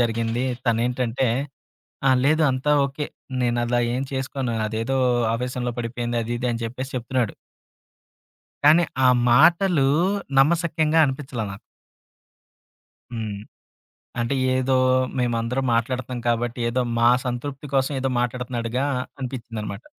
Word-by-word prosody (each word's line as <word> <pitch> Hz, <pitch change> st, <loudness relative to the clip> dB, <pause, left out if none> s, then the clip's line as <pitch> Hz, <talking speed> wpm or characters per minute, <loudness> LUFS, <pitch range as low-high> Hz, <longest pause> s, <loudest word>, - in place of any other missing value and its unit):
జరిగింది. 115 Hz, +1 st, 0 dB, 0.2 s
తనేంటంటే, 120 Hz, +2 st, +1 dB, 0.8 s
"ఆ! -, -, +6 dB
లేదు. 155 Hz, +2 st, +3 dB
అంతా 130 Hz, +3 st, 0 dB
ఓకే. 140 Hz, +2 st, -5 dB, 0.3 s
నేనలా 120 Hz, 0 st, +1 dB
ఏం 130 Hz, -, -1 dB
చేసుకోను 130 Hz, -2 st, -2 dB
అదేదో 115 Hz, +5 st, -1 dB, 0.4 s
ఆవేశంలో 125 Hz, 0 st, -3 dB
పడిపోయింది" 120 Hz, 0 st, -2 dB
అది 120 Hz, +2 st, -3 dB
ఇది 125 Hz, +1 st, -1 dB
అని 115 Hz, 0 st, -4 dB
చెప్పేసి 130 Hz, +4 st, -5 dB
చెప్తున్నాడు. 125 Hz, -2 st, -1 dB, 1.3 s
కానీ 160 Hz, +4 st, +7 dB, 0.2 s
ఆ -, -, +7 dB, 0.2 s
మాటలు 165 Hz, +3 st, +5 dB, 0.5 s
నమ్మసక్యంగా 160 Hz, +1 st, +2 dB
అనిపించలే 130 Hz, -4 st, -4 dB
నాకు. 100 Hz, -, -10 dB, 1.5 s
హ్మ్. 110 Hz, -4 st, -4 dB, 0.8 s
అంటే 120 Hz, +4 st, 0 dB, 0.2 s
ఏదో 130 Hz, 0 st, +1 dB, 0.4 s
మేమందరం 120 Hz, +2 st, 0 dB
మాట్లాడుతన్నాం 125 Hz, +1 st, -2 dB
కాబట్టి 120 Hz, +2 st, -1 dB
ఏదో 125 Hz, +2 st, 0 dB, 0.2 s
మా 115 Hz, 0 st, +5 dB, 0.2 s
సంతృప్తి 135 Hz, +4 st, -4 dB
కోసం 135 Hz, +1 st, +2 dB
ఏదో 135 Hz, 0 st, 0 dB
మాట్లాడుతున్నడుగా 125 Hz, 0 st, -2 dB, 0.4 s
అనిపించిందనమాట. 115 Hz, -5 st, -6 dB
125 Hz, 110 wpm, -23 LUFS, 115-135 Hz, 1.5 s, కానీ